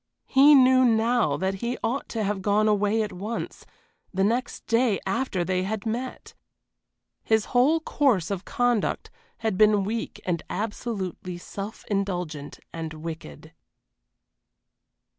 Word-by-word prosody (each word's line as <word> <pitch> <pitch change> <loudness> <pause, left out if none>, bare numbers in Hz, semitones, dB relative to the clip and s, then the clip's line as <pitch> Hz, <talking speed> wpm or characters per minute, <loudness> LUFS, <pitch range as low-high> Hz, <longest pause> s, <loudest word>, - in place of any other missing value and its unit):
He 285 +2 +7
knew 260 -1 +6
now 230 - +2
that 190 +4 -1
he 235 +1 -2
ought 240 +5 -2
to 225 -2 -2
have 200 -1 -1
gone 210 +2 +2
away 210 +1 +2
at 210 - -5
once, 210 +6 -5 0.4
the 190 +1 0
next 235 +5 -1
day 230 -2 +2
after 195 -2 -1
they 185 0 0
had 205 +3 -3
met. 245 +3 -4 0.9
His 220 -2 +2
whole 270 +7 +4
course 240 - +1
of 195 -2 -3
conduct 245 -3 0 0.3
had 215 -4 0
been 210 -2 +5
weak 220 +3 -4
and 170 -3 -1
absolutely 200 -5 -4
self 200 +4 -7
indulgent 180 -8 -3
and 160 -1 -5
wicked. 155 - -8
210 Hz, 130 wpm, -26 LUFS, 185-235 Hz, 0.9 s, He